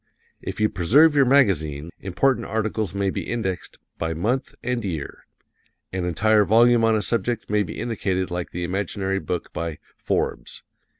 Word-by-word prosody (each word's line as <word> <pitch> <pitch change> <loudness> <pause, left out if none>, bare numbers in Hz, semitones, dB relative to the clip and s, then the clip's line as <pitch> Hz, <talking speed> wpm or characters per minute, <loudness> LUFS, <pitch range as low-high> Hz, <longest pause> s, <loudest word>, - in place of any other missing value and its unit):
If - - -6
you 110 - +4
preserve 140 - +4
your 140 -2 +5
magazines, 85 - +2
important 115 +5 0
articles 110 -3 -2
may 100 -1 0
be - - -5
indexed 95 -6 -3 0.2
by 80 0 -2
month 120 +11 -1
and 125 -1 -1
year. 80 -8 -5 0.7
An 95 -2 -2
entire 105 +5 +3
volume 115 +2 +5
on 115 -1 +4
a 105 - 0
subject 115 +1 -1
may 105 0 +3
be 100 - -5
indicated 95 -5 -2
like 90 -1 -3
the 90 - -5
imaginary 95 +1 -2
book 90 -3 -4
by 85 -2 -4 0.2
"Forbes." - - -2
100 Hz, 160 wpm, -23 LUFS, 90-115 Hz, 0.7 s, your